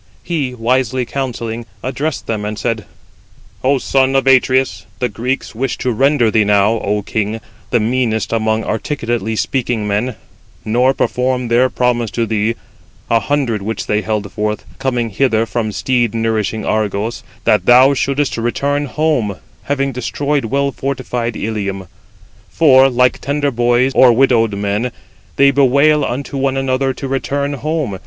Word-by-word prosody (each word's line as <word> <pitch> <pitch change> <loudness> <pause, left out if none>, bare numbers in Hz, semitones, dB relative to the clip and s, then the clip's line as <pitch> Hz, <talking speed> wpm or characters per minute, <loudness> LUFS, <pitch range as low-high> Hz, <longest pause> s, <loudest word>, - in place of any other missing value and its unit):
He 145 -7 -2
wisely 125 +1 0
counselling, 120 -3 -4 0.2
addressed 135 +4 -3
them, 110 -2 -3
and 105 0 -4
said: 115 -4 -2 0.8
"O 135 +2 +3
son 135 0 +1
of 135 - +2
Atreus, 130 -6 +2
the 125 - -1
Greeks 125 +6 -3
wish 130 +4 -2
to 125 - -1
render 130 -1 +2
thee 110 -1 +3
now, 105 +2 +3
O 105 0 -1
king, 110 +2 -2 0.3
the 120 - +2
meanest 115 -2 0
amongst 110 0 0
articulately 115 -3 -2
speaking 115 -3 -1
men; 105 +4 -1 0.5
nor 125 +4 +2
perform 125 -1 0
their 125 +2 +3
promise 120 -3 0
to 115 +2 -1
thee, 110 +1 0 0.5
100 115 -1 +1
which 110 +1 -4
they 105 0 0
held 105 -2 -3
forth, 105 +2 -3
coming 120 -4 -1
hither 115 0 +1
from 115 -2 -2
steed 120 +2 0
nourishing 110 -1 -1
Argos, 110 +1 -1 0.2
that 105 -4 +2
thou 130 +3 +7
shouldest 140 0 -1
return 140 +5 -1
home, 140 -9 0 0.3
having 140 -1 0
destroyed 140 +3 -2
well 140 +4 0
fortified 125 -3 -3
Ilium. 100 -3 -3 0.6
For, 135 -4 +5
like 125 0 +2
tender 145 +1 0
boys, 120 +2 +2
or 125 -1 +6
widowed 115 -4 +3
women, 105 +4 -1 0.4
they 140 0 +5
bewail 140 +2 +4
unto 135 +2 -3
one 135 0 0
another 135 0 0
to 135 - -5
return 140 +2 -2
home. 140 - -3
120 Hz, 145 wpm, -16 LUFS, 110-135 Hz, 0.8 s, thou